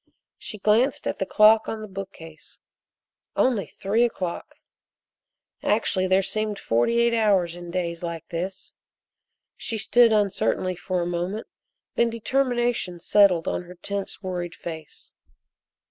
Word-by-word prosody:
She 215 Hz, -, -6 dB
glanced 220 Hz, +7 st, +2 dB
at -, -, -3 dB
the 190 Hz, -, -1 dB
clock 215 Hz, +2 st, +5 dB
on 220 Hz, -, -4 dB
the 215 Hz, -, -6 dB
bookcase 190 Hz, -5 st, -9 dB, 0.8 s
only 240 Hz, -6 st, +2 dB
three 210 Hz, +5 st, 0 dB
o'clock! 185 Hz, -7 st, -3 dB, 1.1 s
Actually 185 Hz, -2 st, +1 dB
there 190 Hz, +1 st, +3 dB
seemed 215 Hz, +1 st, -2 dB
forty 120 Hz, -, +1 dB
eight 235 Hz, 0 st, +3 dB
hours 195 Hz, -7 st, +2 dB
in 175 Hz, 0 st, -9 dB
days 170 Hz, -1 st, -2 dB
like 170 Hz, -2 st, -5 dB
this. 185 Hz, +3 st, -4 dB, 0.8 s
She 225 Hz, -, -3 dB
stood 235 Hz, +2 st, +4 dB
uncertainly 195 Hz, -3 st, +1 dB
for 180 Hz, 0 st, -2 dB
a -, -, -2 dB
moment, 175 Hz, +5 st, -3 dB, 0.5 s
then 235 Hz, -, +4 dB
determination 240 Hz, -5 st, 0 dB
settled 185 Hz, -2 st, +4 dB
on -, -, -1 dB
her 180 Hz, +1 st, -11 dB
tense 200 Hz, +3 st, -5 dB
worried 175 Hz, -2 st, -4 dB
face. 160 Hz, -3 st, -9 dB
195 Hz, 130 wpm, -25 LUFS, 175-220 Hz, 1.1 s, clock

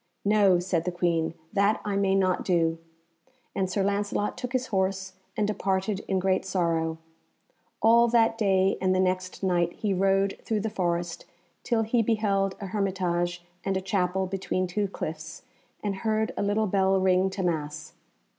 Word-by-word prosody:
"No," 200 Hz, -3 st, +5 dB
said 175 Hz, -2 st, -1 dB
the 180 Hz, -, 0 dB
Queen, 170 Hz, -2 st, 0 dB, 0.2 s
"that 200 Hz, +2 st, +2 dB
I 205 Hz, -1 st, -1 dB
may 195 Hz, -1 st, +2 dB
not 185 Hz, -2 st, +1 dB
do," 165 Hz, -3 st, +1 dB, 0.7 s
and 190 Hz, -1 st, -1 dB
Sir 195 Hz, +1 st, 0 dB
Lancelot 205 Hz, +1 st, -1 dB
took 250 Hz, -1 st, -5 dB
his 255 Hz, 0 st, 0 dB
horse 190 Hz, 0 st, 0 dB, 0.2 s
and 210 Hz, -, +2 dB
departed 195 Hz, -1 st, -1 dB
in 190 Hz, -, +1 dB
great 185 Hz, 0 st, +1 dB
sorrow. 165 Hz, -3 st, 0 dB, 0.9 s
All 235 Hz, +1 st, +6 dB
that 225 Hz, -1 st, +3 dB
day 195 Hz, -3 st, +2 dB
and 185 Hz, 0 st, +2 dB
the -, -, +2 dB
next 185 Hz, 0 st, -1 dB
night 175 Hz, -2 st, +1 dB
he 210 Hz, -3 st, -1 dB
rode 195 Hz, +1 st, +1 dB
through 215 Hz, -2 st, -1 dB
the 220 Hz, +1 st, -3 dB
forest 175 Hz, -3 st, -2 dB, 0.4 s
till 225 Hz, -2 st, +1 dB
he 230 Hz, +2 st, +2 dB
beheld 200 Hz, -4 st, +1 dB
a 200 Hz, -, -5 dB
hermitage 175 Hz, -3 st, -1 dB, 0.2 s
and 195 Hz, -1 st, 0 dB
a -, -, 0 dB
chapel 190 Hz, -1 st, 0 dB
between 185 Hz, 0 st, -2 dB
two 200 Hz, +3 st, -1 dB
cliffs, 160 Hz, -2 st, -6 dB, 0.4 s
and 200 Hz, -2 st, -2 dB
heard 220 Hz, +2 st, 0 dB
a -, -, -2 dB
little 205 Hz, +2 st, +1 dB
bell 195 Hz, -1 st, +2 dB
ring 185 Hz, 0 st, +3 dB
to 190 Hz, 0 st, -4 dB
Mass. 155 Hz, -3 st, -3 dB
190 Hz, 165 wpm, -27 LUFS, 180-205 Hz, 0.9 s, All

